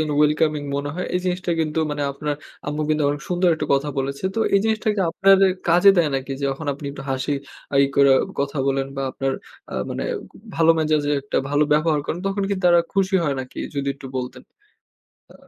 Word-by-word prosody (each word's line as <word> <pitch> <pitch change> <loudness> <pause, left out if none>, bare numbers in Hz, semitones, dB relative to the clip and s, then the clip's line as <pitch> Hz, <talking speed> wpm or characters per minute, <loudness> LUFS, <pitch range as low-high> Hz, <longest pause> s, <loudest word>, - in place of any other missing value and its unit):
যেন 155 -1 -1
welcoming 150 0 +2
মনে 145 0 -3
হয়। 180 - -3
এই 180 - +1
জিনিসটা 180 0 -1
কিন্তু 155 0 -1
মানে 145 0 -2
আপনার 150 +1 -3 0.3
আম্মু 150 +1 -2
কিন্তু 155 0 +1
অনেক 145 +1 -2
সুন্দর 180 0 +2
একটা 150 -1 -4
কথা 140 +2 0
বলেছে। 140 +5 -3
তো - - -2 0.2
এই 200 - +5
জিনিসটা 220 0 0
কি 200 - -1
আপনার 195 +2 +5
এ - - +4 0.2
কাজে 175 +4 +7
দেয় 165 -3 +4
নাকি? 135 0 -3
যে 140 - -1
যখন 140 +3 -6
আপনি 145 0 -8
একটু 135 - -8
হাসি 130 +2 -1 0.5
ই - - +4
করে 140 -1 +5 0.3
কথা 140 +1 -2
বলেন 135 0 0
বা, 135 - -2
আপনার 135 0 -2 0.4
আ - - -5 0.2
মানে - - -3
আক - - -4 0.4
ভালো 165 0 +5
মেজাজের 155 -2 +1
একটা 140 - -1
ভালো 145 +1 +3
ব্যবহার 155 0 +2
করেন, 170 - -2
তখন 195 0 -1
কিন্তু 195 -2 -2
তারা 175 -1 +6
খুশি 195 0 +1
হয় 140 -3 0
নাকি? 130 -1 -9 0.2
যদি 140 0 -2
একটু 140 -1 -11
বলতেন। 125 -1 -5 0.9
আ - - -23
150 Hz, 215 wpm, -22 LUFS, 140-175 Hz, 0.9 s, কাজে